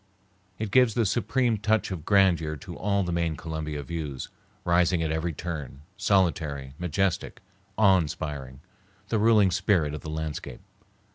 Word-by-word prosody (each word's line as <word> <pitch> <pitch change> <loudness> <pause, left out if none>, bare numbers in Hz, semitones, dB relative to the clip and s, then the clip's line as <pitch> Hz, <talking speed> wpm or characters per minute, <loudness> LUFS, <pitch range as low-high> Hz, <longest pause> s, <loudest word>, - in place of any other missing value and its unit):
It 110 -2 -4
gives 125 -4 +4
the 115 - +2
supreme 120 +2 +1
touch 110 -1 +1
of 85 -4 -5
grandeur 90 -6 +3
to 70 - -9
all 100 0 0
the 90 - -3
main 85 -2 0
Columbia 75 -2 -4
views, 75 -2 -5 0.4
rising 85 0 +3
at 80 - -1
every 80 +2 -1
turn, 75 -4 -6
solitary, 80 -9 0
majestic, 90 +1 -1 0.4
awe 95 -3 +6
inspiring, 70 -4 -5 0.5
the 110 - +1
ruling 105 -3 +5
spirit 90 -5 +1
of 75 - -5
the 80 - -7
landscape. 75 -5 -5
85 Hz, 145 wpm, -27 LUFS, 75-100 Hz, 0.5 s, awe